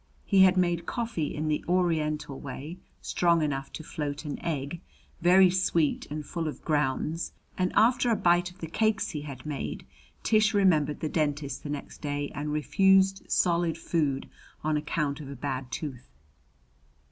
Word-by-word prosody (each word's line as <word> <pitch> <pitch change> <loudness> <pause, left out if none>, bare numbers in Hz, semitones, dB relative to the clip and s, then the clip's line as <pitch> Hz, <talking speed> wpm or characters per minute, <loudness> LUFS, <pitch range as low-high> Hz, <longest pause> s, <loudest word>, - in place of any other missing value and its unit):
He 195 -2 +4
had 190 0 +6
made 175 -2 +1
coffee 225 -11 -2
in 155 +1 -2
the 150 -1 0
Oriental 155 -6 0
way 145 +6 -7 0.2
strong 170 -2 +2
enough 135 -2 -2
to 160 - -6
float 150 0 -4
an 145 - -5
egg, 150 +1 -3 0.4
very 180 +2 +6
sweet 170 -4 +1
and 150 0 -5
full 165 +1 -3
of 150 - -7
grounds; 150 +2 0 0.2
and 185 0 0
after 245 +2 +4
a 230 - +4
bite 175 -2 +3
of 180 +1 -19
the - - -3
cakes 220 +6 +1
he 150 -5 -4
had 140 -4 -8
made, 150 -2 -4 0.4
Tish 215 -2 +3
remembered 155 -7 +3
the 155 - 0
dentist 145 -4 -1
the 145 - -7
next 145 -1 -6
day 145 -1 -2
and 150 +1 -3
refused 195 +5 +3
solid 170 -2 +2
food 150 -5 -1 0.4
on 155 0 +1
account 150 -1 -1
of 140 - -8
a 140 - -6
bad 135 -2 -4
tooth. 135 -6 -6
155 Hz, 165 wpm, -28 LUFS, 145-180 Hz, 0.4 s, had